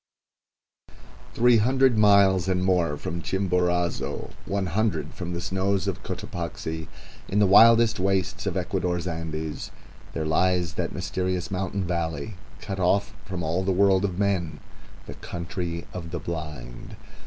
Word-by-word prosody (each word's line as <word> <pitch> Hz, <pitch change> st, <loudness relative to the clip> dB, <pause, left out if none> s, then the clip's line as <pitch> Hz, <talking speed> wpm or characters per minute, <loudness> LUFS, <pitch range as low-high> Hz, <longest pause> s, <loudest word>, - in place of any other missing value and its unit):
Three 120 Hz, 0 st, +5 dB
hundred 130 Hz, +3 st, +3 dB
miles 100 Hz, -3 st, +5 dB
and 90 Hz, -1 st, +1 dB
more 85 Hz, -5 st, +2 dB
from 85 Hz, +4 st, -5 dB
Chimborazo, 90 Hz, -2 st, -1 dB, 0.2 s
one 100 Hz, -1 st, -1 dB
hundred 105 Hz, +5 st, -1 dB
from 90 Hz, -1 st, -5 dB
the 85 Hz, -, -3 dB
snows 95 Hz, +1 st, 0 dB
of 95 Hz, -, -3 dB
Cotopaxi, 80 Hz, -2 st, -5 dB, 0.4 s
in 100 Hz, -, -2 dB
the 105 Hz, -, +5 dB
wildest 115 Hz, +2 st, +6 dB
wastes 95 Hz, -1 st, 0 dB
of -, -, -1 dB
Ecuador's 90 Hz, -1 st, -1 dB
Andes, 80 Hz, -2 st, -4 dB, 0.4 s
there 80 Hz, -, -2 dB
lies 90 Hz, +1 st, +1 dB
that -, -, -2 dB
mysterious 90 Hz, -1 st, -2 dB
mountain 95 Hz, 0 st, -2 dB
valley, 85 Hz, 0 st, -2 dB, 0.3 s
cut 95 Hz, -2 st, -5 dB
off 95 Hz, +2 st, +2 dB
from 95 Hz, -3 st, -4 dB
the 90 Hz, +4 st, 0 dB
world 95 Hz, 0 st, +4 dB
of 95 Hz, -3 st, -1 dB
men, 90 Hz, -7 st, 0 dB, 0.5 s
the -, -, -8 dB
Country 85 Hz, 0 st, -5 dB
of 85 Hz, -2 st, -6 dB
the 85 Hz, +1 st, -4 dB
Blind. 75 Hz, -7 st, -7 dB
90 Hz, 135 wpm, -25 LUFS, 85-100 Hz, 0.5 s, wildest